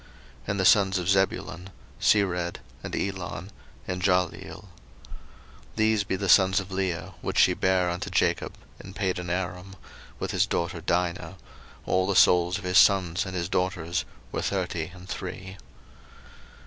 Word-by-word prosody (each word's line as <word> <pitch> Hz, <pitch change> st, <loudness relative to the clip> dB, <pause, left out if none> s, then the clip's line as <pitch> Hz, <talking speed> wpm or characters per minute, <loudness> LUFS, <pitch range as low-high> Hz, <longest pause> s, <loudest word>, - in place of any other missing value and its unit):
01:046:014 -, -, -23 dB, 0.4 s
And 100 Hz, -, -1 dB
the 95 Hz, -, +1 dB
sons 95 Hz, 0 st, +5 dB
of 90 Hz, 0 st, -2 dB
Zebulun; 95 Hz, -1 st, 0 dB, 0.3 s
Sered, 90 Hz, -4 st, +2 dB, 0.3 s
and -, -, -5 dB
Elon, 95 Hz, 0 st, -4 dB, 0.4 s
and 90 Hz, 0 st, -3 dB
Jahleel. 90 Hz, -2 st, 0 dB
01:046:015 -, -, -16 dB, 1.1 s
These 110 Hz, -1 st, +2 dB
be -, -, -1 dB
the 100 Hz, +1 st, -3 dB
sons 95 Hz, 0 st, +5 dB
of 95 Hz, 0 st, -8 dB
Leah, 95 Hz, -3 st, -3 dB
which -, -, -3 dB
she -, -, +5 dB
bare 95 Hz, -1 st, +1 dB
unto 90 Hz, -, -4 dB
Jacob -, -, 0 dB, 0.3 s
in 95 Hz, +1 st, -11 dB
Padanaram, 90 Hz, 0 st, -3 dB, 0.4 s
with -, -, -4 dB
his -, -, +2 dB
daughter 85 Hz, 0 st, -2 dB
Dinah: 90 Hz, +1 st, -1 dB, 0.5 s
all 95 Hz, 0 st, +1 dB
the 100 Hz, -, 0 dB
souls 90 Hz, +1 st, +5 dB
of 100 Hz, -, -10 dB
his 90 Hz, -1 st, +4 dB
sons 95 Hz, -2 st, +3 dB
and 95 Hz, -, -6 dB
his 85 Hz, -1 st, -2 dB
daughters 90 Hz, -2 st, -1 dB, 0.3 s
were -, -, -2 dB
thirty 90 Hz, -4 st, -2 dB
and 90 Hz, +1 st, -13 dB
three. 95 Hz, 0 st, -7 dB
90 Hz, 150 wpm, -26 LUFS, 90-95 Hz, 1.1 s, sons